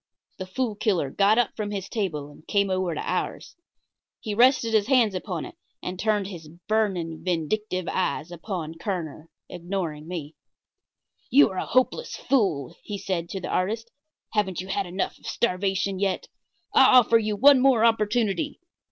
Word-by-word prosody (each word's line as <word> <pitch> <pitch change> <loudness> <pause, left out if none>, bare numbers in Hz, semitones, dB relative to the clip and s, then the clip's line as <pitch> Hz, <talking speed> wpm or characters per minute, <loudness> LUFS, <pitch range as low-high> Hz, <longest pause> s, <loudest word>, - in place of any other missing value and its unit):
The 185 - -5
Fool 225 +4 -2
Killer 190 -9 0
got 205 +6 +3
up 245 -2 +1
from 210 -1 -3
his 195 -2 -4
table 155 -10 -3
and 150 - -18
came 200 -1 +1
over 185 -3 0
to - - -4
ours. - - -3 0.6
He 215 - -4
rested 240 0 +4
his 215 -1 +3
hands 245 -6 +4
upon 180 -3 -4
it, - - -10 0.3
and 180 0 -5
turned 210 -2 +1
his 175 -5 -8 0.2
burning, 190 -7 0
vindictive 185 +2 -1
eyes 170 -2 -1
upon 165 -2 -5
Kerner, 165 -5 -4 0.2
ignoring 170 -4 -4
me. 165 -4 -6 1.0
"You 285 +2 +6
are 185 - -3
a - - -3
hopeless 255 - +1
fool," 190 - 0
he 205 - -5
said 175 -3 -3
to 190 - -4
the - - -6
artist. 225 +5 -1 0.4
"Haven't 195 -5 0
you 185 +1 -6
had 195 0 -1
enough 185 +2 -3
of - - -12
starvation 195 -2 0
yet? 195 -1 -1 0.5
I 255 - +7
offer 230 -1 +5
you 215 -1 -1
one 275 +5 +7
more 250 -4 +4
opportunity. 225 +4 +1
195 Hz, 165 wpm, -25 LUFS, 175-220 Hz, 1.0 s, I